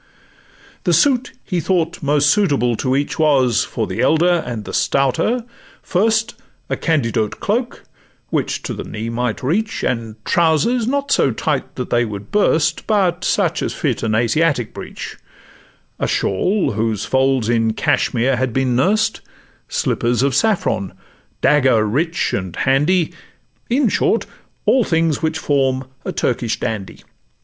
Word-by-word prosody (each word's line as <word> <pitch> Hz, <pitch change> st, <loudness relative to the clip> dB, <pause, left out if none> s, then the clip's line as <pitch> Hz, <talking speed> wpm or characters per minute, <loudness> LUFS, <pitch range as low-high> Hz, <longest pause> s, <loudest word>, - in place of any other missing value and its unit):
The -, -, +2 dB
suit 265 Hz, -3 st, +2 dB
he 180 Hz, -4 st, -2 dB
thought 170 Hz, 0 st, -1 dB
most 145 Hz, 0 st, +3 dB
suitable 140 Hz, -, +2 dB
to 130 Hz, +2 st, 0 dB
each 145 Hz, +3 st, -2 dB
Was, 135 Hz, -7 st, +3 dB
for -, -, -3 dB
the -, -, -3 dB
elder 170 Hz, +2 st, +3 dB
and 115 Hz, -4 st, -5 dB
the -, -, -7 dB
stouter, 140 Hz, -, +1 dB, 0.4 s
first 220 Hz, +4 st, +1 dB, 0.4 s
A -, -, +2 dB
Candiote 115 Hz, -, 0 dB
cloak, 235 Hz, +4 st, -2 dB, 0.5 s
which -, -, -1 dB
to -, -, -4 dB
the -, -, -6 dB
knee 110 Hz, +2 st, -5 dB
might 120 Hz, 0 st, -2 dB
reach, 210 Hz, +11 st, -1 dB
And 115 Hz, -3 st, -2 dB
trousers 170 Hz, -, +2 dB
not 280 Hz, +2 st, -1 dB
so -, -, +4 dB
tight 140 Hz, +4 st, -2 dB
that 125 Hz, -, -5 dB
they 120 Hz, 0 st, +3 dB
would 105 Hz, -2 st, -7 dB
burst, 160 Hz, -6 st, +1 dB
But 200 Hz, -5 st, +1 dB
such -, -, +1 dB
as -, -, -2 dB
fit -, -, -1 dB
an 110 Hz, -1 st, 0 dB
Asiatic 120 Hz, +2 st, +1 dB
breech; -, -, -8 dB, 0.8 s
A -, -, 0 dB
shawl, 185 Hz, -, 0 dB
whose 110 Hz, -1 st, -1 dB
folds 130 Hz, -3 st, +1 dB
in 115 Hz, -1 st, +1 dB
Cashmire 125 Hz, +3 st, +1 dB
had 130 Hz, -1 st, -1 dB
been 130 Hz, -1 st, +1 dB
nurst, 205 Hz, -, +1 dB, 0.5 s
Slippers 120 Hz, +1 st, 0 dB
of 140 Hz, -1 st, +1 dB
saffron, 175 Hz, -, 0 dB, 0.5 s
dagger 130 Hz, -7 st, +4 dB
rich 160 Hz, +11 st, 0 dB
and 95 Hz, -3 st, -3 dB
handy; 150 Hz, +6 st, +2 dB, 0.6 s
In 255 Hz, +2 st, +2 dB
short, -, -, +1 dB, 0.4 s
all 260 Hz, -, +4 dB
things 165 Hz, -5 st, +1 dB
which 160 Hz, -1 st, -1 dB
form 135 Hz, -3 st, 0 dB, 0.2 s
a -, -, -3 dB
Turkish 120 Hz, -2 st, -1 dB
Dandy. 105 Hz, -4 st, -4 dB
140 Hz, 145 wpm, -19 LUFS, 120-175 Hz, 0.8 s, so